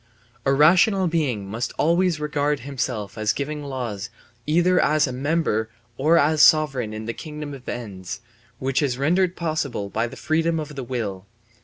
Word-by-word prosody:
A - - +5
rational 180 +7 +5
being 145 - 0
must 110 +5 -3
always 170 +1 +2
regard 150 -1 0
himself 120 -6 -4
as 110 -1 +1
giving 150 +1 -4
laws 120 -8 -4 0.4
either 175 +4 +3
as 150 -1 +3
member 130 -4 0 0.3
or 155 +7 +3
as 155 +1 +3
sovereign 135 -9 +4
in 110 +1 -6
a 115 - -2
kingdom 150 0 -7
of 130 -2 -9
ends 100 -7 -6 0.4
which 130 +2 0
is 130 -4 0
rendered 175 +6 +2
possible 150 - -2
by 115 +2 0
the - - -10
freedom 165 +1 0
of 150 -1 -6
will. 100 -6 -4
145 Hz, 155 wpm, -23 LUFS, 120-155 Hz, 0.4 s, A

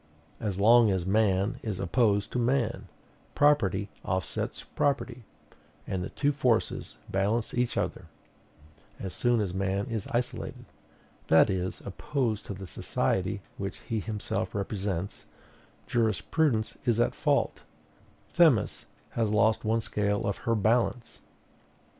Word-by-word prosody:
As 100 -4 -3
long 115 +2 +6
as 95 -3 0
man 100 +3 +2
is 105 -5 -4
opposed 100 +2 +1
to 125 - -1
man, 120 -1 0 0.5
property 105 -10 +3 0.2
offsets 95 -3 -3
property, 125 -4 -1 0.6
and 95 -1 -2
the - - -4
two 145 0 +1
forces 125 - 0
balance 105 +4 0
each 125 -1 0
other; - - -2 0.9
as 95 -3 -5
soon 120 +4 +2
as 100 -4 -1
man 95 +1 -1
is 110 -4 -3
isolated, 120 +1 -3 0.6
that 80 +5 +6
is, 95 -1 -3
opposed 115 +1 -2
to 100 - -4
the 95 0 -8
society 95 +2 -1 0.2
which 95 -1 -4
he 115 - -2
himself 105 -2 -3
represents, 100 -2 -3 0.6
jurisprudence 115 - +1
is 120 -2 +2
at - - +2
fault: - - +1 0.7
Themis 160 - +3 0.3
has 115 -2 0
lost 110 +1 +3
one 115 +1 +1
scale 105 -1 -1
of 100 -1 0
her 115 - +4
balance. 115 +2 +1
105 Hz, 125 wpm, -28 LUFS, 95-120 Hz, 0.9 s, long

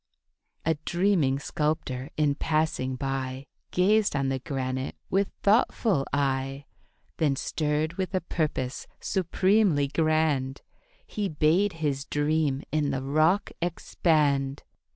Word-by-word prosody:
A 160 - +3
dreaming 175 -7 +2
sculptor 145 -3 -2
in 150 -2 +3
passing 155 -4 0
by 135 0 -3 0.2
Gazed 205 +1 +3
on 135 -1 +1
the 135 0 -1
granite 130 -1 -3 0.2
with 195 +1 +2
thoughtful 205 - +2
eye; 135 0 -1 0.5
Then 150 -4 +2
stirred 155 +4 -1
with 190 0 -1
a 185 - +1
purpose 150 -6 -2
supremely 185 -4 +2
grand 155 -3 +1 0.4
He 205 -2 -3
bade 165 +6 +2
his 140 -2 0
dream 145 -2 0
in 150 -2 +1
the 135 -1 -2
rock 155 +8 +2
expand. 150 -5 +1
150 Hz, 110 wpm, -27 LUFS, 135-170 Hz, 0.5 s, A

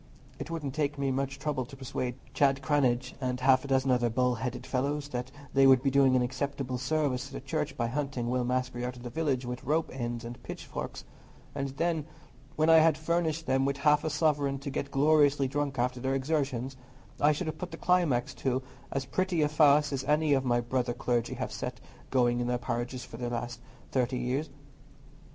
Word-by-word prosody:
It - - -6
wouldn't 155 -5 -4
take 150 -1 -1
me 140 -1 0
much 135 +1 -2
trouble 135 -1 -2
to 135 +3 -11
persuade 125 -1 -3 0.2
Chad 135 0 +2
Cranage 130 -4 +1
and 125 -1 -1
half 130 0 +4
a - - -6
dozen 135 -1 +2
other 120 -1 +3
bull 125 +2 +2
headed 125 +1 -4
fellows 140 +3 -1
that 125 -1 -4 0.2
they 135 0 +6
would 130 -1 +6
be 135 - +2
doing 135 -1 +5
an 125 - +3
acceptable 130 0 -3
service 140 -1 0
to 140 - -13
the - - -4
Church 155 -2 -3
by 115 - 0
hunting 130 -1 -2
Will 125 +1 +1
Maskery 125 0 -1
out 125 0 -4
of 120 - -11
the 120 - -6
village 135 -3 0
with 125 0 -5
rope 155 +4 0
ends 120 -2 -4
and 120 +1 -8
pitchforks; - - -6 0.5
and 140 0 -2
then, 165 -2 0 0.5
when 155 +1 +2
I 165 0 +8
had 160 -1 +4
furnished 160 0 0
them 135 +1 +2
with 140 0 0
half 150 +1 +3
a 155 - 0
sovereign 145 -2 +1
to 140 - -4
get 140 - -3
gloriously 145 -1 +4
drunk 140 0 -2
after 125 +1 0
their 130 +2 0
exertions, 135 -2 -1 0.4
I 150 - +5
should 155 +5 -2
have 155 -1 -4
put 180 - -4
the - - -8
climax 145 -8 +2
to 130 0 0 0.3
as 135 -1 -2
pretty 180 +2 0
a - - +3
farce 150 -1 +4
as 135 - -2
any 150 0 +3
of 135 -1 +2
my 120 -2 +2
brother 120 0 -1
clergy 120 -1 -1
have - - -4
set - - -5 0.3
going 120 -2 +2
in 120 - -1
their 125 0 +1
parishes 120 +1 -3
for 120 -3 -10
the 120 0 -3
last 120 0 -4 0.3
thirty 125 -1 +1
years." 130 +5 -1
135 Hz, 210 wpm, -29 LUFS, 125-145 Hz, 0.5 s, I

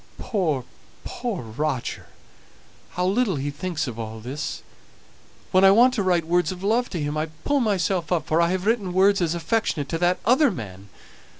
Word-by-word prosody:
Poor, 160 - -1 0.4
poor 230 - -4
Roger! 130 +3 -3 0.9
How 180 - +1
little 200 0 +1
he 145 +1 -3
thinks 160 +1 -3
of 120 -4 -6
all 110 0 -6
this! 140 +6 -5 0.9
When 185 +1 +4
I 195 - +9
want 240 +6 +6
to 230 - 0
write 180 -4 +1
words 175 0 +1
of 185 0 -8
love 230 +5 +1
to 175 - -4
him 145 0 -2
I 155 +1 -1 0.2
pull 285 0 +2
myself 190 -6 0
up, 165 -4 +1
for 160 +2 +2
I 170 - +3
have 185 +1 -2
written 210 -5 0
words 195 +1 +4
as 170 -1 0
affectionate 170 -5 -1
to 165 - -2
that 180 +1 +2
other 260 +5 +5
man. 100 - -8
180 Hz, 185 wpm, -24 LUFS, 150-200 Hz, 0.9 s, I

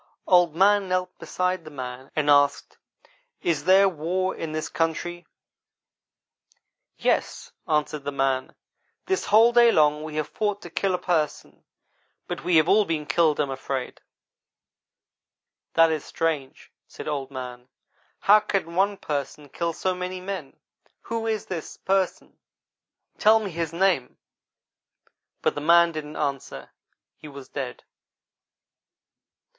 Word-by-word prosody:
Old 175 -3 +4
man 200 +1 +4
knelt 185 0 -1
beside 180 -1 -2
the 155 - -10
man 130 -2 -7
and 150 -1 0
asked: 145 -1 +3 0.7
'Is 160 -3 0
there 195 +1 +6
war 185 +2 -1
in 160 - -5
this 155 0 -3
country? 165 +1 -3 0.7
' - - -45
"'Yes,' - - -1 0.2
answered 150 -1 0
the 145 - -3
man. 135 -1 -1 0.5
'This 380 0 -1
whole 225 +3 +6
day 235 -1 +6
long 150 -3 +3
we 155 -1 -7
have 155 -1 -1
fought 205 -2 -2
to 175 - -10
kill 190 +1 0
a - - -1
Person, 160 -5 -2 0.6
but - - -5
we 175 0 +1
have 155 0 +5
all 205 +3 +5
been 160 -5 -3
killed, 150 +1 +2
I - - +4
am 140 - -4
afraid.' 130 -1 -5 1.7
"'That 165 0 +6
is 155 -2 -2
strange,' 155 -5 -3 0.2
said - - -10
Old 140 -3 -3
man; 125 -2 -8 0.5
'how 210 +2 +7
can 195 -5 -2
one 195 +3 +1
Person 145 -1 -5
kill 170 +4 -2
so 185 +3 -1
many 180 0 -5
men? 195 +1 -7 0.4
Who 230 0 -4
is 220 -2 -1
this 170 -4 -6
Person, 190 -1 -1 0.8
tell 220 +1 +6
me 205 -3 -5
his 165 -1 -3
name!' 170 -7 0 1.3
but - - +2
the 145 - -5
man 170 +2 +5
didn't 155 -1 -7
answer 140 -2 -4 0.5
he - - -12
was 140 -2 -11
dead. 130 -4 -6
165 Hz, 140 wpm, -25 LUFS, 145-185 Hz, 1.7 s, how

